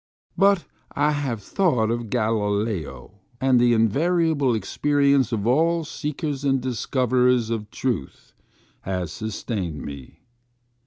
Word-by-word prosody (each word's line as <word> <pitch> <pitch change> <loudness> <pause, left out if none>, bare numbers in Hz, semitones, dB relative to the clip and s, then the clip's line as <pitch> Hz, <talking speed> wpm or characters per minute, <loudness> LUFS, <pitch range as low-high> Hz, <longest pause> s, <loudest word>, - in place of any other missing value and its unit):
But 195 -2 +3 0.3
I 145 +1 +2
have 135 -8 -3
thought 125 - +1
of 120 -1 -3
Galileo, 105 - -2 0.2
and 130 -1 +3
the 120 0 +4
invariable 145 - +2
experience 140 +4 +1
of 110 -3 -2
all 165 +7 +2
seekers 150 -2 -4
and 135 -1 +2
discoverers 125 -1 +1
of 105 -2 -3
truth 115 - -4 0.5
has 90 -4 -3
sustained 100 - -4
me. 70 -3 -9
120 Hz, 110 wpm, -23 LUFS, 105-140 Hz, 0.5 s, the